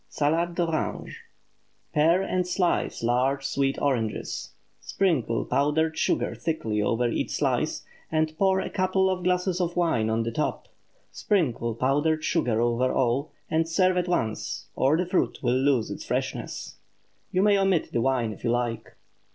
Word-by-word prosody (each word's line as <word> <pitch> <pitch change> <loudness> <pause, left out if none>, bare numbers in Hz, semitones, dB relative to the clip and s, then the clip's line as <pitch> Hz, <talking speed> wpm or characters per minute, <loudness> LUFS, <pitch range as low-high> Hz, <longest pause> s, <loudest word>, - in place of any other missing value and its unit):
SALADE 165 +4 0
D'ORANGE. 165 -3 -2 0.8
Pare 165 +5 +4
and 180 -1 -1
slice 180 -8 0
large 130 +4 +1
sweet 135 -1 0
oranges; 120 -6 -2 0.3
sprinkle 150 -12 0
powdered 155 +3 +1
sugar - - 0
thickly 115 -10 -2
over 115 +3 +1
each 115 - -1
slice, - - -1 0.3
and 155 0 0
pour 190 -1 +3
a - - -3
couple 190 0 +1
of 180 -1 -3
glasses 180 0 +1
of 175 -1 -1
wine 160 -11 +1
on 115 +1 +1
the 115 - -3
top. 150 +7 -2 0.4
Sprinkle 125 - 0
powdered 145 +6 +1
sugar 125 -11 +1
over 120 +2 +1
all, 130 +4 0 0.2
and 165 +1 0
serve 185 +2 +3
at 180 0 0
once, 115 -11 -2
or 140 +4 +3
the 180 - 0
fruit 180 +1 0
will 120 - +2
lose 130 -3 +2
its - - -6
freshness. - - -4 0.5
You 185 - +2
may 205 -1 +5
omit 195 -4 +1
the 115 - 0
wine 120 -4 +1
if - - -15
you 120 - 0
like. 115 -2 -2
150 Hz, 155 wpm, -26 LUFS, 120-180 Hz, 0.8 s, may